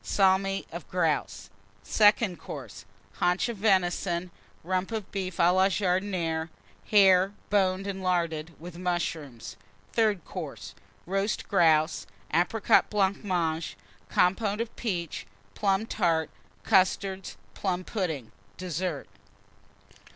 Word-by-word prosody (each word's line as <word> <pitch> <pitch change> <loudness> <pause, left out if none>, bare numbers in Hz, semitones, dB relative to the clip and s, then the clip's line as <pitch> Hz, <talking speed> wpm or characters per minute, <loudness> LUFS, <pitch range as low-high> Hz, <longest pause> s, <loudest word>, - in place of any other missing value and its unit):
Salmi 195 0 +2
of 170 +1 -8
Grouse. 160 - -1 0.3
SECOND 205 -4 +3
COURSE. - - -8 0.3
Haunch 180 +6 +2
of 235 - -4
Venison. 180 -3 +1 0.3
Rump 185 +4 -1
of 215 -3 -4
Beef 190 -3 -4
à 175 +1 +4
la 190 +1 +4
Jardinière. 180 -4 -1 0.4
Hare, 195 -2 +5 0.2
boned 190 -1 +2
and 195 -1 -4
larded, 170 -3 -1
with 170 +1 -9
Mushrooms. 160 -9 -3 0.4
THIRD 210 -6 +2
COURSE. 115 - -7 0.3
Roast 195 +3 -1
Grouse. 160 -4 +3 0.3
Apricot 180 +7 +3
Blancmange. 185 -5 0 0.3
Compôte 200 +3 +2
of 230 0 -4
peaches. 175 -8 -3 0.3
Plum 195 +1 +1
Tart. 165 -7 0 0.3
Custards. 190 0 +1 0.2
Plum 185 -2 -2
pudding. 160 - -3 0.3
DESSERT. 175 -4 -3
185 Hz, 105 wpm, -28 LUFS, 170-195 Hz, 0.4 s, Hare